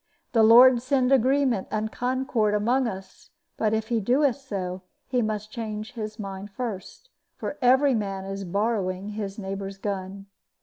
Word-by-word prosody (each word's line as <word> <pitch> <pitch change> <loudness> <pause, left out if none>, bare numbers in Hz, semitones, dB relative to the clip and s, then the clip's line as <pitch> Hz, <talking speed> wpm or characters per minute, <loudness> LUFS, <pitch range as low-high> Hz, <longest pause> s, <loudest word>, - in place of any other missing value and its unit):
The 230 - +3
Lord 240 +2 +8
send 255 0 +1
agreement 260 -4 +2
and 215 +1 -2
concord 245 -4 0
among 240 +5 +2
us; 190 -3 -9 0.3
but, 215 -1 0
if 220 0 -1
He 235 -2 +1
doeth 255 +4 +2
so, 190 -9 -5 0.2
He 250 -2 0
must 215 -1 -3
change 215 -2 -5
his 215 -2 -6
mind 195 -1 -6
first, 230 - -7 0.3
for 295 - -5
every 265 +2 +5
man 195 -4 -2
is 195 0 -5
borrowing 195 0 -1
his 205 -2 -5
neighbor's 195 -1 -5
gun. 195 0 -5
215 Hz, 150 wpm, -25 LUFS, 195-250 Hz, 0.3 s, Lord